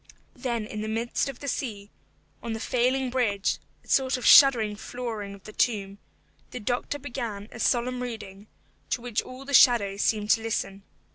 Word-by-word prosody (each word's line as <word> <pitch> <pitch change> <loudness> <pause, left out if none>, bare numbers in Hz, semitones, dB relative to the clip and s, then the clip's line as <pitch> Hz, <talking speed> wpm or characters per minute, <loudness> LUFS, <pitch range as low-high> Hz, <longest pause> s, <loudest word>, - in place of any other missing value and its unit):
Then 235 -4 -3
in 210 0 -6
the 215 - -3
midst 230 +4 -1
of 270 - -9
the 285 - -6
sea, 215 -7 -4 0.5
on 230 -1 -4
the 225 - -4
failing 255 +2 0
bridge 210 -6 0 0.2
(a - - -24
sort 265 -1 +2
of 250 - -6
shuddering 230 -7 +7
flooring 220 -3 -6
of 195 - -17
the 215 - -11
tomb), 200 -4 -1 0.5
the 250 - -7
doctor 245 +5 -2
began 235 -7 -5
a 240 - -10
solemn 250 +1 +1
reading, 215 -4 -7 0.4
to 245 - -1
which 240 -2 -1
all 255 +2 -11
the 280 - -6
shadows 205 -6 +5
seemed 210 -1 +1
to 225 - +4
listen. 205 -3 -3
235 Hz, 180 wpm, -26 LUFS, 210-250 Hz, 0.5 s, shuddering